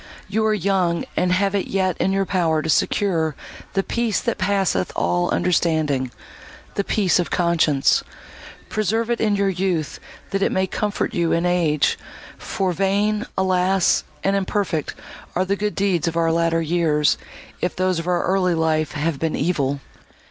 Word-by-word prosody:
You 215 +3 0
are 215 - +3
young, 185 -3 0
and 180 - +1
have 195 +2 +2
it 200 - -1
yet 185 -2 0
in 190 - +1
your 195 0 +1
power 165 -5 +1
to 160 - -3
secure 165 -7 +1 0.4
'the 195 - +1
peace 235 -1 0
that 235 - -2
passeth 190 - +1
all 90 0 +1
understanding'—the 155 +1 -2
peace 195 -4 +2
of 175 - -1
conscience. 165 -5 +2 0.6
Preserve 220 +2 0
it 235 - -1
in 210 -2 +2
your 200 0 +1
youth, 180 -5 -1 0.3
that 195 - -1
it - - +2
may 190 0 +1
comfort 210 +4 -2
you 170 -4 +1
in 170 +1 +1
age; 165 -5 +2 0.4
for 190 -4 -1
vain, 205 +4 0
alas! 185 0 +2 0.2
and 195 +1 +2
imperfect 190 -5 -1 0.4
are 185 - +1
the 195 +1 0
good 210 +1 -2
deeds 190 -5 +1
of 165 0 -2
our 165 -1 +2
latter 165 0 +1
years, 155 -2 +2 0.4
if 180 - -1
those 185 -1 0
of 165 - -5
our 180 -1 +1
early 185 -2 +1
life 155 -3 0
have 150 -1 -1
been 160 -1 -1
evil!" 140 -4 0
180 Hz, 160 wpm, -22 LUFS, 165-195 Hz, 0.6 s, are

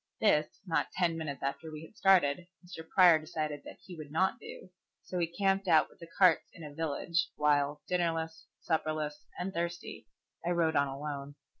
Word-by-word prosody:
This, 155 -8 +4 0.2
not 165 -5 +1
ten 175 -3 +1
minutes 150 -5 -5
after 155 +4 -3
we 155 +1 -8
had 190 - -18
started, 180 -4 +3 0.2
Mr. 165 -2 -10
Prior 175 -4 +7
decided 155 -1 -4
that - - -10
he 180 - -10
would 155 -3 -9
not 185 +5 +1
do, 185 - -11 0.3
so 180 - -4
he 170 - +1
camped 195 +2 0
out 160 -3 +4
with - - -22
the 170 -1 -11
carts 180 -4 +5
in 165 - -11
a 150 -1 -8
village, 165 +2 -1
while, 145 0 +1
dinnerless, 165 -2 -1
supperless, 155 -2 -2
and 185 +2 -3
thirsty, 170 -8 -4 0.4
I 170 - -1
rode 165 -2 +1
on 140 0 +3
alone. 140 0 -6
160 Hz, 180 wpm, -31 LUFS, 150-175 Hz, 0.4 s, Prior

